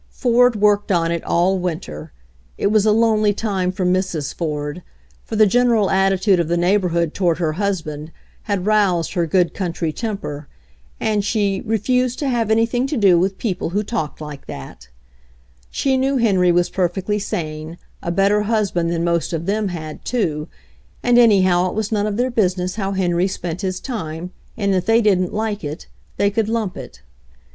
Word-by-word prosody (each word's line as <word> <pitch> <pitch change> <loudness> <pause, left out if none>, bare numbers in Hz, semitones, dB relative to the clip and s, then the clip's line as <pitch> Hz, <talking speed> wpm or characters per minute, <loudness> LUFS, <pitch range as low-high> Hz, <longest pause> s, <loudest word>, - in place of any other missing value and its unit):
Ford 245 -1 +3
worked 205 -1 +2
on 170 -2 +2
it 170 -1 -2
all 185 +3 +2
winter. 155 - -5 0.5
It 200 - +1
was 215 -1 +3
a - - +5
lonely 215 -2 +3
time 195 -5 -1
for 185 0 -3
Mrs. 180 -5 -1
Ford, 150 0 -4 0.4
for 225 - -6
the 215 0 +6
general 230 -1 +3
attitude 190 0 +3
of 170 - 0
the 175 +1 0
neighborhood 175 -3 +1
toward 175 -4 +1
her 160 -3 -1
husband 160 -5 -3 0.4
had 195 -3 0
roused 200 -6 +2
her 170 -2 0
good 175 +1 +2
country 170 -4 -3
temper, 195 - -5 0.5
and 210 -2 0
she 205 -2 0
"refused 250 +3 +1
to 285 - -1
have 235 -3 0
anything 230 +3 +2
to 295 - -2
do 190 -6 +5
with 190 +2 0
people 195 -7 -2
who 205 +4 -1
talked 205 -9 -4
like 150 -2 -9
that/' 65 0 -9 0.8
She 265 - 0
knew 270 +1 +1
Henry 190 -7 +3
was 175 0 +1
perfectly 190 +3 -1
sane, 155 -4 -5 0.2
a - - -4
better 195 +3 +3
husband 205 -6 0
than 170 0 -1
most 170 0 0
of 165 0 -3
them 210 +2 0
had, 155 -4 -7
too, 160 -11 -1 0.6
and 245 0 +4
anyhow 185 -6 +4
it - - -7
was 220 0 -2
none 210 -1 +1
of 210 -1 -2
their 250 +1 0
business 185 -5 0
how 195 -2 -2
Henry 180 -1 +1
spent 175 -2 -5
his 185 -2 -2
time, 175 - -5 0.3
and 200 -3 +1
if 185 -1 -1
they 225 +1 +5
didn't 190 -5 +2
like, 215 -1 -2 0.6
they 200 0 +2
could 220 0 0
lump 220 -5 -1
it. 120 - -10
190 Hz, 175 wpm, -20 LUFS, 170-215 Hz, 0.8 s, the